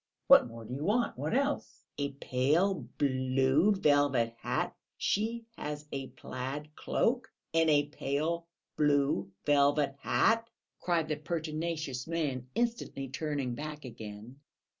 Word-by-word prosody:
What - - +8
more 115 -1 -9
do 125 - -6
you 140 +3 -3
want? 230 +7 +1
What 150 - -1
else?" 280 +2 -1
"A 140 0 0
pale 145 +9 +1
blue 130 +5 +3
velvet 145 - +3
hat! - - -1 0.2
She 225 +3 0
has 150 0 -5
a 135 -1 -3
plaid 140 +5 -6
cloak 240 -1 0 0.2
and 165 -1 +4
a 145 -1 +4
pale 155 +4 -2 0.3
blue 140 -9 +2 0.2
velvet 145 -1 +3
hat!" 230 +7 +2 0.3
cried 170 -3 +1
the 155 -1 -1
pertinacious 155 -3 -3
man, 145 -7 -2
instantly 230 - -1
turning 140 -2 -2
back 150 +2 -6
again. 110 +2 -9
145 Hz, 125 wpm, -31 LUFS, 135-165 Hz, 0.3 s, What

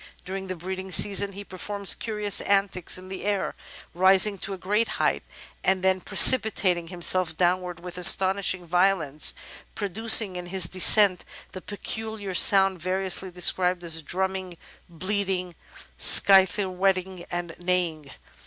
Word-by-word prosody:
During 190 +1 -7
the 185 - -6
breeding 190 +2 -8
season 200 +3 +2
he 200 +1 -10
performs 200 +1 -3
curious 210 -3 -2
antics 195 -3 -2
in 185 0 -14
the 190 - -9
air, 205 -1 -3 0.4
rising 190 +3 +2
to 200 - -5
a - - -14
great 210 +5 -2
height, - - -1 0.4
and 190 -1 -1
''precipitating 190 -2 +3
himself 175 -2 +2
down 180 +1 0
wards 175 -1 -10
with 180 0 -9
astonishing 185 0 +3
violence, 170 -5 0 0.4
producing 210 -1 +2
in 175 0 -8
his 190 +1 -1
descent 185 +1 +5 0.3
the 185 - -10
peculiar 205 0 -8
sound 195 -1 +3
variously 185 +1 -4
described 180 0 -1
as 165 -1 -3
drumming, 185 +2 -5 0.3
bleating, 185 0 -4 0.5
scythe 190 0 +5
whetting, 185 -1 -3
and 175 -1 -6
neighing." 175 -5 -3
185 Hz, 130 wpm, -23 LUFS, 180-195 Hz, 0.5 s, descent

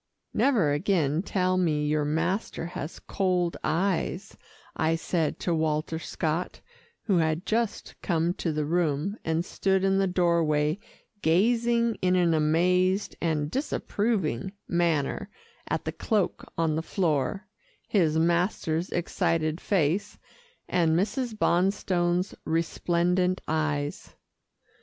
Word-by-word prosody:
"Never 210 - +3
again 155 -1 +1
tell 185 -1 0
me 155 -5 +1
your 150 0 +1
master 165 +5 -1
has 165 -2 -6
cold 180 -3 0
eyes," 180 +4 -1 0.4
I 160 +1 +1
said 165 -1 -1
to 175 - 0
Walter 160 0 0
Scott, 160 +2 -3 0.4
who 195 -5 +2
had 160 +1 0
just 230 -1 -1
come 170 -1 +1
to 170 - -2
the 150 -1 -1
room, 165 +4 0
and 160 +1 0
stood 190 0 0
in 195 0 +3
the 195 - +2
doorway 170 -3 +2 0.4
gazing 235 +6 +2
in 185 0 +3
an 175 -2 +3
amazed 180 +5 +2
and 155 -3 0
disapproving 200 - -1
manner 170 +2 0 0.4
at - - -2
the - - -1
cloak 210 -5 -1
on 165 -2 +1
the 160 - 0
floor, 170 +1 -1 0.4
his 165 -6 +2
master's 170 0 +1
excited 165 -1 0
face, 180 0 0 0.5
and 165 -2 +2
Mrs. 220 +4 -1
Bonstone's 180 -1 +1
resplendent 175 +3 +1
eyes. 155 -2 -2
170 Hz, 115 wpm, -27 LUFS, 160-190 Hz, 0.5 s, Never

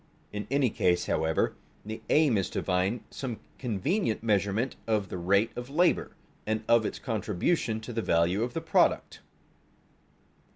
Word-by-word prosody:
In 105 -1 -4
any 135 -3 +2
case, 90 -1 +2
however, 80 0 +1 0.3
the 110 +1 -6
aim 150 -6 +4
is 95 -3 0
to - - -3
find 95 +5 0
some 125 -5 -5 0.2
convenient 125 - -1
measurement 105 +3 +1
of 105 -3 0
the - - -4
rate 100 +6 +2
of 125 +1 -6
labor, 170 +5 +2 0.3
and 110 0 0
of 115 -2 +4
its - - -5
contribution 110 - -1
to 120 +2 -7
the 115 - -1
value 85 +2 +2
of 120 +1 -2
the - - -1
product. - - +2
110 Hz, 155 wpm, -29 LUFS, 100-125 Hz, 0.3 s, aim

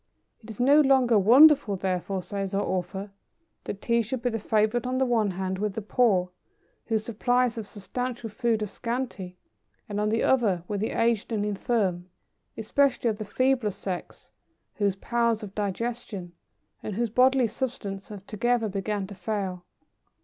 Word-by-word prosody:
'It 225 - -14
is 220 - -9
no 280 +5 +6
longer 260 -5 +4
wonderful, 260 +1 +6
therefore,' 185 0 -2
says 195 0 -4
our 200 - +1
author, 190 +2 -3 0.5
'that 200 - -6
Tea 235 0 +2
should 235 +3 -4
be 245 - +1
the 225 - -2
favourite 220 +4 +1
on 255 0 -1
the 265 - +2
one 230 -4 +2
hand, 190 0 -3
with 210 -1 -1
the 220 - -2
poor 200 -5 +2 0.6
whose 220 -2 0
supplies 245 +2 +1
of 220 -3 -6
substantial 240 +4 -5
food 225 -1 0
are - - 0
scanty; 220 -4 -5 0.5
and, 205 -1 -3
on 210 0 +1
the 225 +1 +1
other, 210 -10 +2
with 205 -1 -2
the 220 - -1
aged 230 -1 0
and 210 -2 0
infirm, 195 -4 -1 0.5
especially 250 +1 +1
of 210 - -7
the 215 - -4
feebler 255 +1 +1
sex, 185 -2 -7 0.5
whose 200 -2 +1
powers 235 +1 0
of 195 -2 -8
digestion, 205 -2 -4 0.5
and 210 - -5
whose 235 0 -1
bodily 255 +1 +4
substance 215 -5 -4
have 200 -2 -9
together 235 +2 0
begun 200 0 -2
to 200 - -9
fail. 190 -2 -3
215 Hz, 165 wpm, -26 LUFS, 195-240 Hz, 0.6 s, no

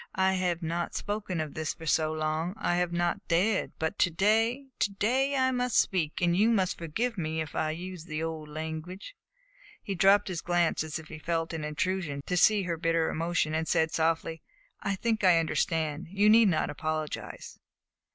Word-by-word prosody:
I 190 0 +3
have 180 -2 -1
not 170 +1 -2
spoken 205 -4 -3
of 155 -1 -2
all - - -15
this 155 -1 -3
for 160 - -10
so 155 0 +2
long. 155 +3 -2
I 175 - 0
have 180 -1 0
not 175 0 -1
dared; 190 +5 +1
but 160 0 -2
to 180 - +4
day 225 - +2
to 205 - +1
day 260 +7 +1
I 260 -1 +2
must 250 -1 0
speak, 165 -5 +1
and 175 -1 +3
you 210 +5 +4
must 190 -5 +1
forgive 215 +7 -2
me 160 -1 -2
if 155 -2 -4
I 155 - 0
use 175 +1 -6
the 155 -1 -4
old 160 -2 -5
language." 160 - -6 0.7
He 200 - -3
dropped 195 +3 +4
his 175 -4 -3
glance 175 -2 +1
as 155 -1 -4
if 160 -1 -11
he 155 - -8
felt 165 +1 -2
it - - -2
an 155 - -4
intrusion 150 -2 -2
to 180 - -1
see 205 +3 +4
her 170 -2 -2
bitter 165 0 +1
emotion, 165 -1 0
and 160 +1 -1
said 160 0 +2
softly: 165 -1 0 0.4
"I 200 - -1
think 220 +2 -1
I 180 -3 +6
understand. 160 -1 -1
You 200 +3 +4
need 225 0 +7
not 160 - 0
apologize." 155 0 -5
170 Hz, 200 wpm, -29 LUFS, 160-195 Hz, 0.7 s, need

